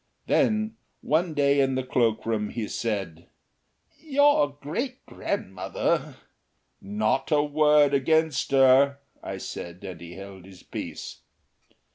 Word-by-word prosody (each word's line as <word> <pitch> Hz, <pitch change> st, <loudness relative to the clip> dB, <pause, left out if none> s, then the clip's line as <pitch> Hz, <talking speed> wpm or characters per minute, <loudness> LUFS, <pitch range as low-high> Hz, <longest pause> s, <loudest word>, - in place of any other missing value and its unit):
Then 215 Hz, 0 st, +1 dB, 0.2 s
one 160 Hz, +1 st, 0 dB
day 140 Hz, 0 st, +3 dB
in 135 Hz, -1 st, +1 dB
the 130 Hz, -, -1 dB
cloakroom 115 Hz, -4 st, 0 dB
he 115 Hz, -3 st, -4 dB
said, 95 Hz, -9 st, -4 dB, 0.7 s
"Your 285 Hz, -, +3 dB
great 160 Hz, -, -5 dB
grandmother 95 Hz, -, -2 dB, 0.4 s
" -, -, -47 dB
"Not 110 Hz, +7 st, -1 dB
a 150 Hz, -1 st, +4 dB
word 150 Hz, -1 st, +4 dB
against 160 Hz, +1 st, +2 dB
her," 135 Hz, +1 st, +5 dB, 0.2 s
I -, -, -5 dB
said; 85 Hz, +2 st, -7 dB
and 90 Hz, -4 st, -8 dB
he 85 Hz, 0 st, -9 dB
held 95 Hz, -2 st, -10 dB
his 95 Hz, -2 st, -15 dB
peace. -, -, -7 dB
135 Hz, 120 wpm, -26 LUFS, 105-150 Hz, 0.7 s, her